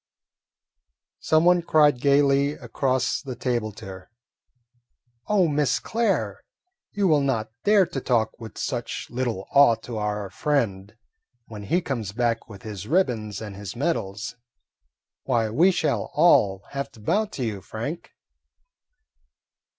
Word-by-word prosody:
Someone 175 +3 +4
cried 150 -6 +3
gayly 140 0 +3
across 130 -3 -1
the 130 -2 -6
table 120 -3 -1
to - - -11
her: 95 -1 -10 1.2
"Oh, 200 -4 +3
Miss 145 -4 +1
Claire, 230 0 -1 0.5
you 200 -1 +1
will 150 -4 +4
not 115 -6 -1
dare 205 -2 +5
to 165 -6 -5
talk 110 -3 +1
with 115 -2 -10
such 120 -2 -4
little 120 -6 -3
awe 140 -5 +6
to 115 -3 -5
our 105 -2 -3
friend 110 -6 -1 0.5
when 105 -3 -9
he 175 - +1
comes 115 - -4
back 115 0 -1
with 100 -3 -11
his 105 -4 -7
ribbons 115 - 0
and 105 -3 -7
his 100 -1 -7
medals. 115 - -2 0.9
Why, 115 -4 +1
we 165 - +5
shall 170 -4 0
all 100 - +4
have 140 0 -4
to 115 - -16
bow 205 - +1
to 140 - -5
you, 105 -4 -4
Frank!" 120 - -6
125 Hz, 135 wpm, -24 LUFS, 110-150 Hz, 1.2 s, awe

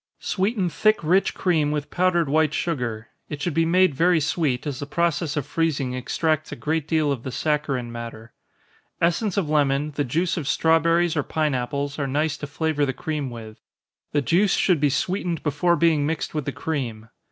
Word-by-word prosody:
_ - - -69 0.2
Sweeten 195 0 0
thick 215 +4 +2
rich 180 +5 +2
cream 160 -5 +1
with 150 -1 -3
powdered 175 -3 +2
white 155 +1 +2
sugar 120 -9 -3 0.2
it 150 - -5
should 165 +2 -2
be 165 +1 +2
made 185 -1 +4
very 170 +4 +3
sweet, 150 -4 0
as 140 -3 -4
the 145 - -5
process 165 -1 0
of 145 - -1
freezing 145 -6 -1
extracts 155 +5 -1
a - - -4
great 160 0 -2
deal 155 -2 +1
of 135 -4 -2
the 130 - -5
saccharine 135 -3 -1
matter. 115 -1 -8 0.7
Essence 175 +4 +1
of 190 -6 +1
lemon, 145 -1 +1
the 145 0 -1
juice 165 +8 0
of 150 -5 -3
strawberries 165 +3 +3
or 150 - +2
pine 155 0 -1
apples, 140 +3 -3
are 140 - -1
nice 150 +3 0
to 150 - -6
flavor 155 0 -1
the 135 -2 0
cream 150 -1 -3
with 110 -2 -10 0.5
the 145 -1 +1
juice 190 +8 +3
should 180 -5 +2
be 145 0 +3
sweetened 175 +3 -1
before 155 +4 +2
being 155 -3 +2
mixed 160 0 -3
with 150 -3 -2
the 145 - -2
cream. 125 -6 -4
150 Hz, 195 wpm, -24 LUFS, 140-170 Hz, 0.7 s, made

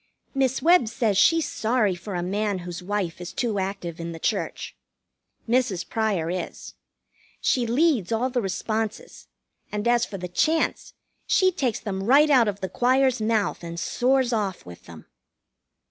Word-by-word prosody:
Miss 265 -1 0
Webb 340 -7 +5
says 220 -2 0
she's 330 - +4
sorry 220 -3 +1
for 180 +2 -7
a 175 - -2
man 205 +2 -1
whose 175 -1 -6
wife 185 -3 -3
is 175 - -6
too 225 -5 -1
active 190 -3 -4
in 170 0 -5
the - - -7
church. - - -2 0.7
Mrs. 235 -7 0
Pryor 200 -7 -1
is. 180 -1 -6 0.7
She 245 -2 +1
leads 250 - +2
all 240 +3 0
the 245 -1 0
responses; 215 +2 -4 0.4
and 210 +2 -2
as 240 0 +3
for 200 - -4
the 180 -1 -5
chants, 315 - 0 0.3
she 375 -1 +4
takes 260 - -1
them 195 -3 -4
right 280 +8 +5
out 250 -5 +5
of 205 -1 -3
the 190 - -3
choir's 255 0 +2
mouth 215 -4 0
and 170 0 -6
soars 255 +5 +1
off 205 -4 -2
with 90 -1 -12
them. 80 -2 -12
215 Hz, 160 wpm, -25 LUFS, 185-250 Hz, 0.7 s, Webb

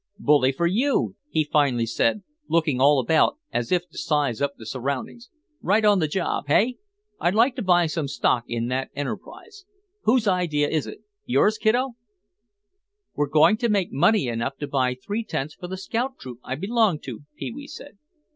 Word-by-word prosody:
"Bully 145 -8 +3
for 170 +6 -1
you," 240 +11 +1
he 155 - +1
finally 140 -6 +1
said, 115 - 0 0.3
looking 155 -6 +1
all 145 +1 +6
about 155 - +2 0.2
as 120 - -2
if 180 -1 +1
to - - -9
size 145 -7 0
up 140 0 -1
the 110 - -11
surroundings. 140 - -4 0.3
"Right 210 +3 +2
on 205 -2 +5
the 155 - +1
job, 175 +4 -2
hey? 230 +12 +2 0.4
I'd 175 +3 +1
like 240 +4 +4
to - - -2
buy 175 -3 +4
some 155 -2 -2
stock 125 -3 0
in 115 -1 -2
that 130 +1 -2
enterprise. 395 - -7 0.4
Whose 225 -1 +3
idea 170 -6 +1
is 155 -2 -1
it? 420 - -9 0.2
Yours, 215 -3 +2
kiddo?" 245 +5 +2 1.2
"We're 145 -1 -1
going 155 +9 +5
to 235 +1 0
make 200 -4 +1
money 200 - +3
enough 115 +3 -3
to 145 - -2
buy 130 -3 0
three 205 - -4
tents 150 -7 -4
for 180 - -9
the 190 +1 -5
scout 240 +7 -3
troop 125 -2 -10
I 130 - -4
belong 205 - +1
to," 125 -5 -7 0.2
Pee - - -5
wee 280 +4 -9
said. 285 -6 -11
165 Hz, 185 wpm, -24 LUFS, 135-215 Hz, 1.2 s, all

